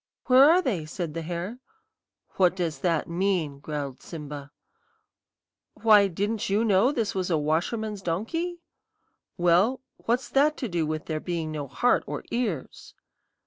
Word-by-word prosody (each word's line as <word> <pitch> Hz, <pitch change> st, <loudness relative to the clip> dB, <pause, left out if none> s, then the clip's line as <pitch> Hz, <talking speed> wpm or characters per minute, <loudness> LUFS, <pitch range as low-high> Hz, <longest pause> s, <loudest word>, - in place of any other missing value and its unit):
"'Where 265 Hz, +3 st, +7 dB
are 360 Hz, +3 st, +5 dB
they?' 180 Hz, -, -1 dB
said 165 Hz, 0 st, -4 dB
the 165 Hz, -, -4 dB
hare. 175 Hz, +8 st, -5 dB, 0.8 s
"'What 180 Hz, -2 st, +4 dB
does 170 Hz, -4 st, -2 dB
this 170 Hz, -4 st, +1 dB
mean?' 170 Hz, -5 st, -1 dB
growled 145 Hz, -3 st, -5 dB
Simba. 145 Hz, -3 st, -8 dB, 1.3 s
"'Why, 210 Hz, -3 st, +6 dB
didn't 205 Hz, +4 st, -2 dB
you 210 Hz, +4 st, +2 dB
know 210 Hz, +4 st, +4 dB
this 230 Hz, -8 st, -1 dB
was 185 Hz, -1 st, -2 dB
a 165 Hz, -, +2 dB
washerman's 190 Hz, +8 st, -1 dB
donkey?' 235 Hz, -, -2 dB, 0.8 s
"'Well, 180 Hz, +8 st, +3 dB, 0.2 s
what's 240 Hz, +3 st, -1 dB
that 295 Hz, +3 st, +3 dB
to 255 Hz, -, -3 dB
do 170 Hz, -5 st, -1 dB
with 155 Hz, 0 st, -3 dB
there 155 Hz, -1 st, -2 dB
being 165 Hz, -2 st, -3 dB
no 150 Hz, -2 st, -4 dB
heart 245 Hz, -, +2 dB
or -, -, -4 dB
ears?' 215 Hz, -, -3 dB
180 Hz, 145 wpm, -26 LUFS, 160-225 Hz, 1.3 s, Where